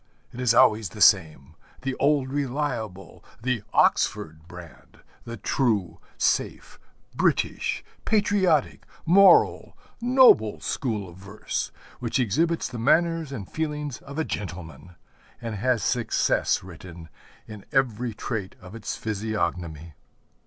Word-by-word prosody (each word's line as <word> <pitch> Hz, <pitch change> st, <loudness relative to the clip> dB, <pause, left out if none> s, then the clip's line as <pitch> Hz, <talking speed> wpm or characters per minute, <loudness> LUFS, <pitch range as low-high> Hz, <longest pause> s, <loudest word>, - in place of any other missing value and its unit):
It 125 Hz, -, -9 dB
is 120 Hz, -2 st, +3 dB
always 110 Hz, -4 st, +4 dB
the -, -, -12 dB
same, 75 Hz, -1 st, +3 dB, 0.3 s
the 135 Hz, 0 st, -2 dB
'old 140 Hz, -2 st, +2 dB
reliable,' 125 Hz, -, -4 dB, 0.2 s
the 125 Hz, -1 st, -1 dB
Oxford 80 Hz, +1 st, +1 dB
brand, 90 Hz, -2 st, -14 dB, 0.2 s
the 115 Hz, 0 st, -7 dB
true, 100 Hz, -, -1 dB, 0.2 s
safe, -, -, -1 dB, 0.3 s
British, -, -, 0 dB, 0.2 s
patriotic, 200 Hz, -8 st, +1 dB, 0.2 s
moral, 195 Hz, +4 st, +5 dB, 0.2 s
noble 245 Hz, -, +5 dB
school 110 Hz, -7 st, -3 dB
of 85 Hz, 0 st, -13 dB
verse; 100 Hz, +3 st, -5 dB, 0.3 s
which 120 Hz, +2 st, -2 dB
exhibits 160 Hz, -, 0 dB
the 120 Hz, -, -7 dB
manners 165 Hz, +4 st, +2 dB
and 105 Hz, -9 st, -6 dB
feelings 150 Hz, -4 st, -4 dB
of 140 Hz, +1 st, -11 dB
a 160 Hz, -, 0 dB
gentleman, 90 Hz, -3 st, -7 dB, 0.4 s
and 115 Hz, -2 st, -5 dB
has 120 Hz, +2 st, 0 dB
success 120 Hz, -6 st, +1 dB
written 85 Hz, -2 st, -11 dB, 0.4 s
in 105 Hz, -2 st, -10 dB
every 125 Hz, -4 st, 0 dB
trait 105 Hz, -5 st, -5 dB
of 90 Hz, +2 st, -13 dB
its 115 Hz, -2 st, -5 dB
physiognomy. 90 Hz, -7 st, -3 dB
115 Hz, 115 wpm, -25 LUFS, 95-140 Hz, 0.4 s, moral